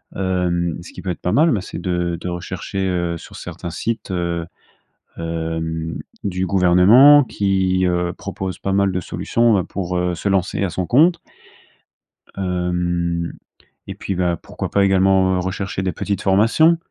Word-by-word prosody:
Hem, 90 Hz, -3 st, -1 dB
ce -, -, -12 dB
qui -, -, -9 dB
peut 95 Hz, -, -5 dB
être 90 Hz, -, -4 dB
pas 90 Hz, -, -1 dB
mal, 160 Hz, +4 st, +4 dB
bah 105 Hz, -, 0 dB
c'est -, -, -7 dB
de 90 Hz, -2 st, -1 dB
de 90 Hz, -, -4 dB
rechercher, 95 Hz, +2 st, -4 dB
heu, 85 Hz, -2 st, -1 dB
sur -, -, -13 dB
certains 85 Hz, 0 st, -7 dB
sites, 110 Hz, +5 st, -3 dB
heu, 85 Hz, -2 st, -2 dB, 0.7 s
hem, 80 Hz, 0 st, -3 dB, 0.3 s
du 95 Hz, -2 st, -1 dB
gouvernement 100 Hz, +11 st, +6 dB
qui, 95 Hz, -4 st, 0 dB
heu, 90 Hz, 0 st, 0 dB
proposent 95 Hz, -1 st, -5 dB
pas 95 Hz, -, -2 dB
mal 100 Hz, -1 st, +2 dB
de 90 Hz, -, -1 dB
solutions 115 Hz, +6 st, +1 dB
bah, 95 Hz, -4 st, +1 dB
pour, 90 Hz, -2 st, -3 dB
heu, 90 Hz, 0 st, 0 dB
se 100 Hz, -, -3 dB
lancer 95 Hz, 0 st, 0 dB
à 95 Hz, -, -1 dB
son 90 Hz, +2 st, -3 dB
compte 165 Hz, -, +4 dB, 1.2 s
hem, 90 Hz, -2 st, -1 dB, 0.5 s
et -, -, -6 dB
puis 95 Hz, -, -4 dB
bah, 90 Hz, -1 st, 0 dB
pourquoi -, -, -6 dB
pas 100 Hz, -, +2 dB
également, 95 Hz, -1 st, +3 dB
heu, -, -, 0 dB
rechercher 95 Hz, +1 st, -3 dB
des 95 Hz, -, 0 dB
petites 100 Hz, +2 st, -3 dB
formations? 115 Hz, -, +4 dB
90 Hz, 165 wpm, -20 LUFS, 85-95 Hz, 1.2 s, gouvernement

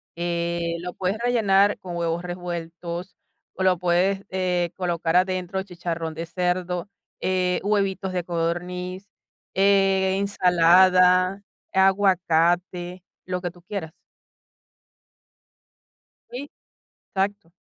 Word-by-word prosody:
que 170 Hz, 0 st, -2 dB
lo 180 Hz, +1 st, -6 dB
puedes 190 Hz, +3 st, -1 dB
rellenar 205 Hz, -4 st, +3 dB
con 175 Hz, -2 st, -7 dB
huevos 170 Hz, 0 st, -1 dB
revueltos 175 Hz, 0 st, -6 dB, 0.4 s
o 190 Hz, -, -2 dB
lo 185 Hz, -1 st, +4 dB
puedes, 180 Hz, +3 st, +1 dB
eh, 180 Hz, -2 st, 0 dB
colocar 175 Hz, -2 st, -1 dB
adentro, 185 Hz, 0 st, +1 dB
chicharrón 170 Hz, -3 st, -4 dB
de 165 Hz, -, -4 dB
cerdo, 180 Hz, +2 st, -2 dB, 0.3 s
eh, 185 Hz, -1 st, +1 dB
huevitos 195 Hz, -2 st, 0 dB
de 180 Hz, -1 st, -1 dB
codorniz, 180 Hz, +3 st, -3 dB, 0.5 s
eh, 195 Hz, -1 st, +3 dB
ensalada, 185 Hz, 0 st, +4 dB, 0.3 s
aguacate, 180 Hz, -2 st, +2 dB, 0.2 s
lo 180 Hz, 0 st, -3 dB
que 175 Hz, -1 st, -3 dB
tú 175 Hz, -, -19 dB
quieras. 175 Hz, -3 st, -6 dB, 2.4 s
Sí, 275 Hz, +4 st, -7 dB, 0.6 s
exacto. 195 Hz, -3 st, -1 dB
180 Hz, 100 wpm, -24 LUFS, 175-190 Hz, 2.4 s, lo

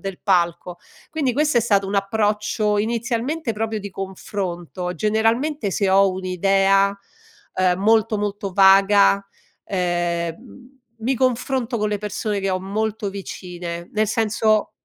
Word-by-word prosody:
del 195 Hz, -2 st, -6 dB
palco. 175 Hz, -2 st, 0 dB, 0.3 s
Quindi 295 Hz, -5 st, 0 dB
questo 295 Hz, 0 st, +2 dB
è -, -, +3 dB
stato 200 Hz, -4 st, +2 dB
un 195 Hz, -, -4 dB
approccio, 210 Hz, +1 st, 0 dB
inizialmente, 235 Hz, +5 st, -1 dB
proprio 220 Hz, 0 st, -2 dB
di 200 Hz, 0 st, -7 dB
confronto. 185 Hz, -2 st, -5 dB
Generalmente 225 Hz, -, 0 dB
se 195 Hz, +1 st, 0 dB
ho 195 Hz, 0 st, +5 dB
un'idea, 195 Hz, +2 st, +2 dB, 0.6 s
uhm, 185 Hz, -1 st, +2 dB
molto, 220 Hz, +1 st, +3 dB
molto 205 Hz, -1 st, -3 dB
vaga, 195 Hz, +1 st, +5 dB, 0.4 s
ehm, 175 Hz, +7 st, -3 dB, 0.2 s
mi 240 Hz, +4 st, 0 dB
confronto 255 Hz, 0 st, 0 dB
con 210 Hz, -, 0 dB
le 205 Hz, -, -1 dB
persone 210 Hz, 0 st, -3 dB
che 195 Hz, 0 st, -1 dB
ho 185 Hz, 0 st, -1 dB
molto 210 Hz, +2 st, -2 dB
vicine. 175 Hz, -3 st, -7 dB
Nel 215 Hz, 0 st, +1 dB
senso 215 Hz, 0 st, +1 dB
205 Hz, 130 wpm, -21 LUFS, 190-225 Hz, 0.6 s, ho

